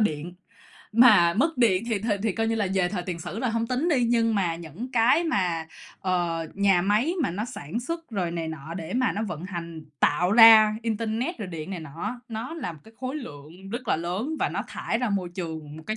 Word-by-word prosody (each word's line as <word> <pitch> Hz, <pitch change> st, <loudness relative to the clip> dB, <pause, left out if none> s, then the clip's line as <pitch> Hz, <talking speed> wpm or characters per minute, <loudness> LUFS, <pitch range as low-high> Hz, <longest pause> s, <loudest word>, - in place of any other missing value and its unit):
điện, 170 Hz, -3 st, -1 dB, 0.6 s
mà 210 Hz, -8 st, +6 dB
mất 280 Hz, +4 st, +1 dB
điện 210 Hz, -5 st, +3 dB
thì 225 Hz, -4 st, 0 dB
thì 220 Hz, +2 st, -2 dB
thì 220 Hz, -4 st, +1 dB
coi 225 Hz, +2 st, -1 dB
như 225 Hz, -, +1 dB
là 210 Hz, -3 st, 0 dB
về 180 Hz, -2 st, +2 dB
thời 185 Hz, -2 st, -3 dB
tiền 175 Hz, -2 st, -5 dB
sử 195 Hz, +6 st, -6 dB
là 250 Hz, -, 0 dB
hông 230 Hz, 0 st, -1 dB
tính 255 Hz, +8 st, 0 dB
đi. 260 Hz, -7 st, +3 dB
Nhưng 230 Hz, -1 st, +2 dB
mà 175 Hz, -5 st, 0 dB
những 170 Hz, -, -8 dB
cái 245 Hz, +8 st, +4 dB
mà, 180 Hz, -, 0 dB, 0.3 s
ờ, 175 Hz, -3 st, -1 dB
nhà 195 Hz, -3 st, +3 dB
máy 215 Hz, -, +2 dB
mà -, -, 0 dB
nó 205 Hz, +5 st, -3 dB
sản 230 Hz, -, -5 dB
xuất 330 Hz, +4 st, -5 dB
rồi 185 Hz, -6 st, -1 dB
này 165 Hz, -1 st, -3 dB
nọ 160 Hz, +1 st, -7 dB
để 170 Hz, +4 st, -5 dB
mà 255 Hz, 0 st, +2 dB
nó 215 Hz, -, -2 dB
vận 180 Hz, -4 st, -6 dB
hành 170 Hz, -4 st, -7 dB, 0.2 s
tạo 180 Hz, +6 st, +2 dB
ra 220 Hz, -2 st, +8 dB
internet 230 Hz, -, -2 dB
rồi 205 Hz, -4 st, -5 dB
điện 165 Hz, 0 st, -6 dB
này 185 Hz, -3 st, -4 dB
nọ 155 Hz, +1 st, -9 dB
á, 215 Hz, +4 st, -2 dB
nó 230 Hz, +7 st, -5 dB
là 180 Hz, -, -4 dB
một 155 Hz, -, -13 dB
cái 220 Hz, -, -16 dB
khối 260 Hz, +3 st, -3 dB
lượng 175 Hz, -, -10 dB
rất 240 Hz, +1 st, -5 dB
là -, -, +3 dB
lớn 190 Hz, -, -3 dB
và -, -, +2 dB
nó -, -, -3 dB
thải 225 Hz, -, -2 dB
ra 250 Hz, -3 st, -1 dB
môi 190 Hz, -3 st, -1 dB
trường 160 Hz, -4 st, -6 dB
một 160 Hz, -, -10 dB
cái 215 Hz, -, -2 dB
200 Hz, 235 wpm, -26 LUFS, 170-235 Hz, 0.6 s, ra